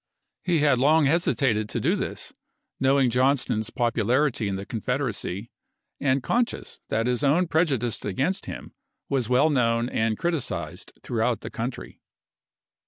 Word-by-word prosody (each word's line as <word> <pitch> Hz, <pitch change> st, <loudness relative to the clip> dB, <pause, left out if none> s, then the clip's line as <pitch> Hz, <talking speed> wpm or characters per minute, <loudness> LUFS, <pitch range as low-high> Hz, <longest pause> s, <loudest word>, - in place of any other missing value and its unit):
He 170 Hz, -4 st, +2 dB
had 145 Hz, -4 st, +4 dB
long 150 Hz, +3 st, +4 dB
hesi 165 Hz, +5 st, +2 dB
tated 110 Hz, -6 st, +1 dB
to -, -, -3 dB
do -, -, +2 dB
this, -, -, -4 dB, 0.5 s
knowing 135 Hz, -1 st, +3 dB
Johnston's 125 Hz, -4 st, +1 dB
popularity 120 Hz, 0 st, +1 dB
in 100 Hz, -, -2 dB
the 100 Hz, +1 st, -5 dB
Confederacy, 115 Hz, -3 st, -3 dB, 0.5 s
and 135 Hz, -1 st, +1 dB
conscious 240 Hz, -, -1 dB
that 115 Hz, +1 st, 0 dB
his 125 Hz, +2 st, 0 dB
own 160 Hz, +6 st, +3 dB
preju 160 Hz, -4 st, +2 dB
dice 115 Hz, -2 st, -3 dB
against 135 Hz, -, -1 dB
him -, -, -8 dB, 0.4 s
was 130 Hz, -5 st, 0 dB
well 135 Hz, +5 st, +4 dB
known 115 Hz, -3 st, +1 dB
and 110 Hz, -2 st, 0 dB
criticized 95 Hz, -, -3 dB
throughout -, -, 0 dB
the -, -, -7 dB
country. -, -, -6 dB
125 Hz, 145 wpm, -25 LUFS, 115-145 Hz, 0.5 s, had